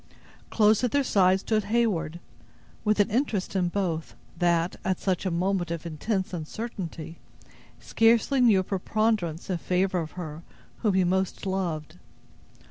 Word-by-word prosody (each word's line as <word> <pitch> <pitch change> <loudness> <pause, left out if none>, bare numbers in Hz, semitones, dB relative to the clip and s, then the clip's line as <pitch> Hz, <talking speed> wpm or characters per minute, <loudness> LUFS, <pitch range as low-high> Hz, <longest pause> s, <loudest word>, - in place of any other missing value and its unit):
Close 215 +1 +4
at 250 - +3
their 285 +4 +2
side 190 -5 +3
stood 215 -1 0
Heyward, 200 -8 0 0.6
with 210 0 +1
an 205 +1 +3
interest 220 -6 -1
in 180 -2 +2
both, 175 -4 -2 0.2
that, 170 0 +1
at 190 -1 0
such 190 0 -1
a - - +1
moment 180 0 0
of 170 -1 -4
intense 185 +5 -2
uncertainty, 170 -2 -6 0.6
scarcely 230 +4 +3
knew 215 -6 +5
a - - -5
preponderance 195 -3 -1
in 180 -3 -2
favor 185 +1 0
of 160 -2 -5
her 160 -3 -7 0.4
whom 210 -5 +1
he 190 - +4
most 190 +2 -1
loved. 175 -4 -3
190 Hz, 145 wpm, -27 LUFS, 170-215 Hz, 0.6 s, knew